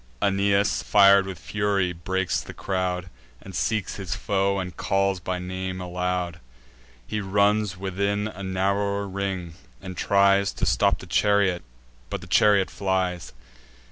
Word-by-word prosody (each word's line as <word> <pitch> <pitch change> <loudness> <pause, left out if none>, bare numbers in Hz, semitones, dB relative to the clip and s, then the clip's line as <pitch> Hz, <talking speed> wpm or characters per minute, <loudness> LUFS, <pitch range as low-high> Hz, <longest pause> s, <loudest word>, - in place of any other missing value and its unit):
Aeneas, 100 0 +2
fir'd 100 -1 +5
with 95 -2 -6
fury, 100 -3 -1
breaks 95 +2 -1
the - - -10
crowd, 90 -1 -2 0.3
And 95 - -11
seeks 110 -2 -1
his 95 -5 -4
foe, 100 0 0
and 90 -3 -4
calls 95 0 0
by 90 +1 -3
name 95 +1 -4
aloud: 90 -1 -2 0.7
He 105 - -3
runs 100 0 +1
within 100 +2 -1
a 100 -2 -9
narrower 100 +2 0
ring, 95 -3 -4 0.3
and 95 -1 -8
tries 100 +1 +3
To - - -1
stop - - +2
the - - -11
chariot; 100 -3 +2 0.5
but - - -4
the - - -10
chariot 100 -3 +3
flies. 95 -3 -2
95 Hz, 140 wpm, -25 LUFS, 90-100 Hz, 0.7 s, fir'd